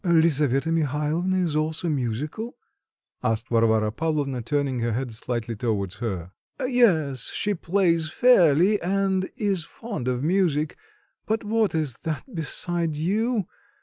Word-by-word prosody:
"Lisaveta 160 -4 +3
Mihalovna 165 +4 0
is 160 -4 -1
also 155 +2 -1
musical?" 150 - -3 0.7
asked 115 +1 -1
Varvara 110 -2 +3
Pavlovna, 145 -2 -1
turning 140 0 -1
her 115 -1 0
head 125 +1 -2
slightly 115 0 -3
towards 100 -4 -2
her. 95 -7 -4 0.3
"Yes, 185 - +2
she 210 - -1
plays 170 -3 +1
fairly, 190 - +4
and 190 +1 0
is 200 -7 0
fond 200 - -6
of 125 0 -1
music; 160 -3 +1 0.5
but 220 +1 0
what 220 -3 +1
is 150 -7 -1
that 160 -3 -4
beside 165 0 -1
you? 210 +7 0
155 Hz, 125 wpm, -25 LUFS, 125-185 Hz, 0.7 s, fairly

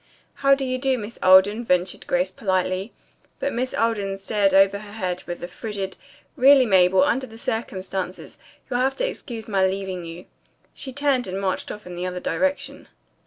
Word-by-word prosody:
"How 275 0 +4
do 275 -1 -3
you 255 0 -2
do, 265 0 +1
Miss 220 0 -8
Alden?" 190 +5 +6
ventured 180 -4 0
Grace 180 +1 +1
politely, 185 +1 -1 0.5
but 280 - -1
Miss 255 +2 -2
Alden 205 -4 0
stared 195 0 +1
over 195 +1 +4
her 205 -1 -11
head 185 -4 -3
and - - -15
with 175 0 -6
a - - -3
frigid, 195 +1 -5 0.4
"Really, 270 -1 +6
Mabel, 185 -2 +5
under 260 +6 0
the 225 -1 -13
circumstances, 190 -5 -4 0.3
you'll 245 -2 -1
have 265 +1 +1
to - - 0
excuse 230 - -6
my 195 -3 +1
leaving 190 -2 -4
you," 170 +1 -9 0.5
she 270 - -7
turned 275 -2 +1
and 190 +1 -3
marched 190 -1 -2
off 210 - -9
in 180 -1 -8
the 180 +1 -3
other 180 0 -4
direction. 285 +9 -2
200 Hz, 185 wpm, -23 LUFS, 185-245 Hz, 0.5 s, Alden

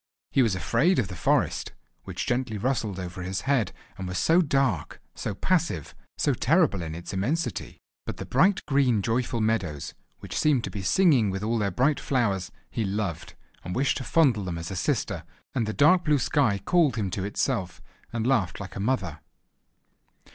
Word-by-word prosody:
He 135 - +4
was 110 -6 +2
afraid 120 - +2
of 105 -7 0
the 90 - -6
forest, 80 - 0 0.3
which - - -4
gently 120 -3 -1
rustled 110 -4 -1
over 90 0 -6
his 90 +1 -3
head, 135 -8 +1 0.3
and 95 - -4
was 90 - -3
so 170 +3 +4
dark, 135 - 0
so 100 - -4
passive, 160 - 0 0.2
so 145 - +2
terrible 140 - +2
in 80 -1 -5
its 85 +3 -7
immensity. 135 - -2 0.3
But - - -4
the - - -6
bright 195 +2 +3
green 130 -7 +2
joyful 115 +1 0
meadows, 95 -10 -1 0.2
which - - -8
seemed 145 -6 +2
to - - -4
be 100 - -5
singing 135 - +4
with 95 +1 -3
all 115 +1 0
their 100 -2 +1
bright 130 +10 +2
flowers, 100 -8 0 0.2
he 115 - -1
loved, 100 -4 -3 0.3
and 90 - -5
wished 135 +2 +1
to 135 - -4
fondle 130 -9 +3
them 85 -2 -3
as 85 +2 -6
a - - -4
sister; 85 - -1 0.3
and 115 -4 0
the - - -1
dark 160 +9 +4
blue 150 -2 +4
sky 130 -5 +2
called 165 - +2
him 100 -5 -2
to 95 +1 -3
itself, 100 -3 -2 0.3
and 115 -1 -2
laughed 120 -9 +1
like 100 -1 -8
a - - -5
mother. 100 - -1
110 Hz, 185 wpm, -26 LUFS, 95-135 Hz, 0.3 s, He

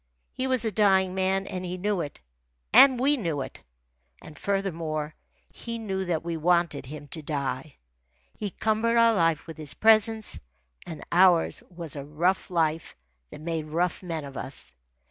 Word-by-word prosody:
He 260 - -2
was 255 -3 +1
a 220 - 0
dying 190 -3 +3
man, 190 +1 0
and 185 0 -5
he 180 0 -4
knew 200 0 0
it, 145 -3 -7 0.5
and 265 -3 +8
we 285 +3 +3
knew 165 - -2
it. 130 - -8 0.6
And 155 - -13
furthermore, 165 -5 -2 0.4
he 230 -1 -6
knew 190 -4 -3
that 165 -3 -1
we 170 -1 -2
wanted 170 -4 +1
him 145 +1 -8
to 160 - -6
die. 140 -1 -3 0.6
He 205 - -4
cumbered 220 +4 +1
our 230 0 +6
life 165 -5 +1
with 165 -1 -9
his 155 -2 -3
presence, 220 0 +3 0.5
and 160 -3 -7
ours 175 -1 +4
was 170 -4 -6
a 140 - -5
rough 170 +6 0
life 160 -2 0 0.3
that - - -11
made 160 -1 -3
rough 170 +3 -1
men 165 -5 -4
of 140 -1 -9
us. 65 - -6
175 Hz, 165 wpm, -27 LUFS, 155-200 Hz, 0.6 s, and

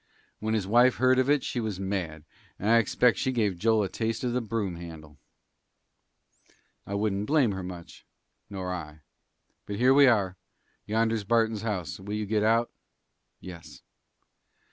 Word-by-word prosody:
When 110 +1 -1
his 105 -4 -1
wife 120 +5 +4
heard 130 0 +3
of 130 +1 +1
it 145 -2 +3
she 125 - -3
was 110 -5 -3
mad, 90 -6 -3 0.3
and 105 +3 0
I 115 - +6
expect 115 -1 +2
she 130 - 0
gave 105 -8 0
Joel 110 0 +3
a - - -1
taste 110 +4 -3
of 125 -1 -1
the 125 - 0
broom 105 -6 -3
handle." 80 -3 -11 1.7
"I 100 - -4
wouldn't 100 0 -1
blame 145 -7 +3
her 95 -1 -4
much." 90 -2 -9 0.5
"Nor 95 -2 -4
I. 80 -3 -8 0.7
But 100 - -4
here 125 +5 +4
we 140 0 +7
are. 100 -6 +2 0.5
Yonder's 110 0 0
Barton's 110 0 +1
house. 95 -9 -4
Will 100 +2 -5
you 105 0 -2
get 105 +1 0
out?" 115 +2 +2 0.7
"Yes." 85 -3 -11
105 Hz, 165 wpm, -27 LUFS, 95-115 Hz, 1.7 s, we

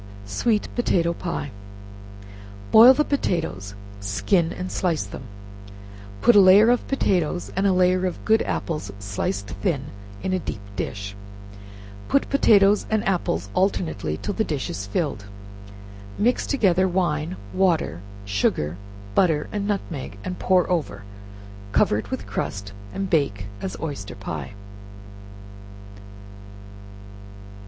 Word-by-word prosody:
Sweet 210 - 0
Potato 170 -8 +1
Pie. 170 -5 -4 1.2
Boil 240 +4 +9
the 300 - +2
potatoes, 160 - -2 0.2
skin 165 - +1
and 185 0 -5
slice 170 -4 0
them; - - -9 1.0
put 240 - +6
a - - +9
layer 200 +5 +7
of 245 - 0
potatoes 180 - 0
and 195 +2 +2
a - - +4
layer 185 0 +3
of 180 - -6
good 220 0 +4
apples 150 -12 -3
sliced 100 0 -3
thin 145 -8 -1 0.3
in 190 - -1
a 185 - +1
deep 105 - -6
dish; 100 +1 -4 0.9
put 275 - +1
potatoes 205 -7 +5
and 220 -2 0
apples 100 - -1
alternately 180 - 0
till 205 - -3
the 220 - 0
dish 150 -9 -3
is 100 0 -5
filled, 110 - -2 0.9
mix 240 +4 +1
together 190 -9 +3
wine, 175 -2 -1 0.2
water, 170 - +1 0.2
sugar, 90 -5 0 0.4
butter 160 - +2
and 205 -1 -2
nutmeg, 165 - -4
and 180 - -5
pour 185 -2 +3
over, 145 - -2 0.7
cover 105 - +3
it 100 -2 -8
with 100 - -4
crust, 100 -1 -4 0.2
and 195 -1 -4
bake 120 - +1 0.2
as 95 +1 -5
oyster 140 -11 -5
pie. 85 -5 -6
170 Hz, 125 wpm, -23 LUFS, -, 1.2 s, Boil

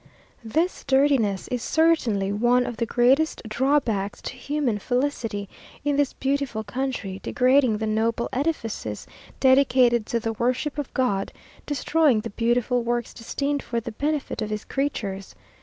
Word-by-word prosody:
This 320 +11 -1
dirtiness 265 -8 +2
is 245 -1 -2
certainly 250 -13 +2
one 240 +4 +3
of 240 - -5
the 230 - -1
greatest 260 +7 +2
drawbacks 225 -4 0
to - - -5
human 255 -4 -1
felicity 245 -4 -2 0.4
in 290 -1 +2
this 285 -2 +1
beautiful 270 -5 -1
country, 220 -4 -3
degrading 255 -2 +3
the 220 - -2
noble 220 +2 0
edifices 240 - -2 0.3
dedicated 255 -4 +4
to 235 - 0
the 225 0 -2
worship 255 +6 -1
of 290 - -4
God, 200 -7 0 0.4
destroying 290 -4 +2
the 230 - -6
beautiful 240 +2 +1
works 240 0 -2
destined 280 +5 -2
for 235 - -2
the 230 +1 -6
benefit 290 +2 -2
of 215 - -2
his 215 0 -4
creatures. 205 -9 -3
245 Hz, 140 wpm, -24 LUFS, 220-280 Hz, 0.4 s, dedicated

